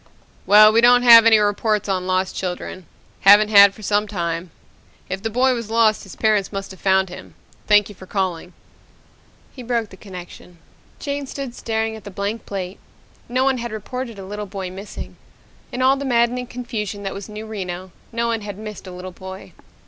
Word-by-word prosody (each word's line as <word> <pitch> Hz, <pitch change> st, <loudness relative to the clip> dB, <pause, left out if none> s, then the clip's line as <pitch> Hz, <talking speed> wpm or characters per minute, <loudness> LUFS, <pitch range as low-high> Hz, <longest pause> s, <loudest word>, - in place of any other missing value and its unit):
"Well, 215 Hz, +1 st, +8 dB
we 230 Hz, -, +5 dB
don't 245 Hz, +1 st, +6 dB
have 230 Hz, -2 st, +9 dB
any 225 Hz, -1 st, +7 dB
reports 210 Hz, 0 st, 0 dB
on 185 Hz, -2 st, -1 dB
lost 185 Hz, 0 st, 0 dB
children. 180 Hz, -1 st, -5 dB, 0.3 s
Haven't 205 Hz, +2 st, +7 dB
had 200 Hz, -2 st, +7 dB
for 215 Hz, -, -13 dB
some 205 Hz, +1 st, +1 dB
time. 170 Hz, -3 st, -3 dB, 0.6 s
If 190 Hz, +1 st, -4 dB
the 225 Hz, -, -2 dB
boy 255 Hz, +3 st, +2 dB
was 230 Hz, -3 st, -5 dB
lost 225 Hz, -1 st, +3 dB
his 195 Hz, -, -11 dB
parents 215 Hz, -4 st, +1 dB
must 195 Hz, -1 st, -5 dB
have 190 Hz, -, -12 dB
found 190 Hz, -1 st, +2 dB
him. 90 Hz, -, -11 dB, 0.3 s
Thank 210 Hz, -1 st, +5 dB
you 205 Hz, -, -11 dB
for 185 Hz, -1 st, -14 dB
calling." 185 Hz, -3 st, -3 dB, 1.0 s
He 260 Hz, -, -8 dB
broke 235 Hz, -3 st, -2 dB
the 190 Hz, -, -13 dB
connection. 180 Hz, -2 st, -11 dB, 0.4 s
Jane 285 Hz, -1 st, -4 dB
stood 270 Hz, -2 st, -6 dB
staring 220 Hz, -1 st, -2 dB
at 220 Hz, -, -11 dB
the -, -, -8 dB
blank 200 Hz, +3 st, -4 dB
plate. 190 Hz, -1 st, -5 dB, 0.5 s
No 255 Hz, +2 st, +1 dB
one 265 Hz, -1 st, +1 dB
had 235 Hz, -1 st, -5 dB
reported 230 Hz, +2 st, -6 dB
a 195 Hz, -, -8 dB
little 205 Hz, +1 st, -6 dB
boy 190 Hz, -1 st, -6 dB
missing. 195 Hz, +3 st, -9 dB, 0.5 s
In 255 Hz, +1 st, -2 dB
all 265 Hz, +1 st, +4 dB
the 280 Hz, -, -5 dB
maddening 245 Hz, -1 st, +1 dB
confusion 220 Hz, -5 st, -5 dB
that 195 Hz, -, -4 dB
was 195 Hz, +1 st, -8 dB
New 210 Hz, +1 st, -7 dB
Reno, 185 Hz, -4 st, -6 dB, 0.2 s
no 235 Hz, 0 st, -1 dB
one 230 Hz, -1 st, -1 dB
had 205 Hz, -2 st, -7 dB
missed 210 Hz, -2 st, -9 dB
a -, -, -8 dB
little 180 Hz, +1 st, -8 dB
boy. 190 Hz, +1 st, -10 dB
210 Hz, 195 wpm, -21 LUFS, 190-230 Hz, 1.0 s, have